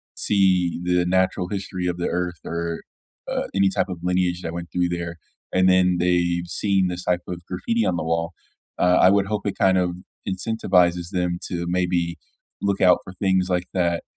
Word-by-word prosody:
see 95 -4 +2
the 90 0 +2
natural 95 0 +1
history 95 -2 -4
of 90 -1 -2
the 90 - -1
earth 90 -1 -2
or, 85 0 -3 0.5
uh, - - -1
any 100 0 +3
type - - 0
of 90 -2 -5
lineage 90 -1 0
that 85 -1 -5
went 85 0 -6
through 90 -1 0
there, 85 -1 -4 0.4
and 95 0 +4
then 90 -1 +4
they've 85 0 +1
seen 95 +1 +1
this 90 0 -4
type 90 0 +1
of 85 -1 -6
graffiti 105 +6 -1
on 90 - +1
the 80 - -2
wall, 85 +1 -1 0.5
uh, 90 0 +4
I 90 - +7
would 100 -1 +2
hope 105 0 -3
it 100 - -2
kind 95 -1 +4
of 90 -1 0 0.3
incentivizes 90 -3 +1
them 90 -2 -1
to, 85 -1 -3
maybe, 90 -1 0 0.4
look 100 -1 0
out 90 -2 +6
for 95 - -10
things 95 0 +1
like 90 0 0
that. 85 -2 0
90 Hz, 190 wpm, -23 LUFS, 85-95 Hz, 0.5 s, I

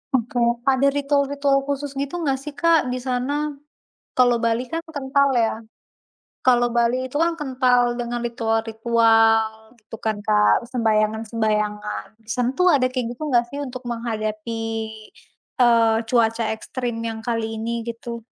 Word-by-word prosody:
Oke. 245 0 -1 0.2
Ada 270 +1 +3
ritual-ritual 280 0 +1
khusus 285 0 -3
gitu 280 +4 -3
enggak 270 -3 0
sih, 295 +2 -8
Kak, 335 -4 +3
di 250 - -2
sana? 285 +4 -1 0.7
Kalau 245 -1 +5
Bali 230 +2 0
kan 330 +4 -4
kental 280 -1 +1
ya, 225 -1 +2 0.9
kalau 245 -1 +4
Bali 240 +2 +2
itu 260 - -6
kan 340 - +1
kental 250 -3 +2
dengan 240 0 -3
ritual-ritual 225 -1 +2
gitu 215 +1 -10
kan, 220 -1 0
Kak, 210 +2 +3
sembahyangan-sembahyangan. 215 -2 0
Di 220 - -27
sana 250 0 +1
tuh 365 0 +5
ada 265 -3 +3
kayak 255 -2 -2
gitu - - -11
enggak 240 -1 +4
sih 280 - -7
untuk 255 -1 -7
menghadapi, 225 -1 -3 1.0
eee, 230 -2 +5
cuaca 230 -1 +2
ekstrim 240 +1 -5
yang 225 -1 -4
kali 225 -1 -2
ini 225 +1 -3 0.2
gitu? 235 0 -6
240 Hz, 140 wpm, -22 LUFS, 225-265 Hz, 1.0 s, Kalau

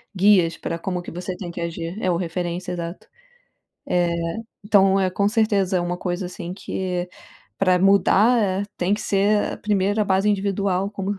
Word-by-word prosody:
guias 185 -3 +4
pra 165 - -4
como 180 +1 -3
que - - -9
você 180 +2 -5
tem 180 -2 -7
que 170 - -8
agir, 170 +1 -4
é 185 - 0
o 175 - +2
referência, 175 +1 -3
exato. 170 0 -6 0.8
Eh, 175 -1 +2 0.5
então 195 -2 +4
é 185 -1 +1
com 200 +2 +1
certeza 205 -4 +1
é - - 0
uma 175 0 -2
coisa 180 0 -3
assim 180 0 -7
que 180 -2 -3 0.5
pra 185 -2 +3
mudar, 200 +5 +4
eh, 195 -1 0
tem 185 +3 +1
que 210 - -5
ser 205 0 +1
a - - -10
primeira 205 +1 +1
base 195 +1 +2
individual, 195 -1 0
como 200 -1 -4
190 Hz, 175 wpm, -22 LUFS, 175-200 Hz, 0.8 s, guias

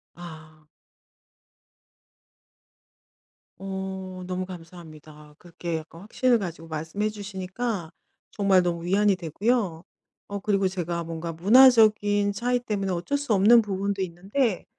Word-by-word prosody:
아. 155 -2 -12 2.9
어. 190 -1 -6
너무 185 0 -3
감사합니다. 155 -4 -12
그렇게 170 -1 -5
약간 165 +2 -11
확신을 240 +3 +1
가지고 170 -4 -6
말씀해 160 +7 -3
주시니까 195 -2 -5 0.4
정말 195 -2 +3
너무 170 -1 -2
위안이 200 +1 +3
되고요. 185 +1 -1 0.4
어. 200 0 -5
그리고 195 -1 +1
제가 175 -2 -3
뭔가 165 0 -5
문화적인 210 0 +5
차이 245 +4 0
때문에 200 -5 -3
어쩔 180 +12 -1
수 285 -6 -1
없는 215 +4 +6
부분도 200 -1 -2
있는데 190 +5 -1
190 Hz, 265 characters per minute, -25 LUFS, 170-205 Hz, 2.9 s, 없는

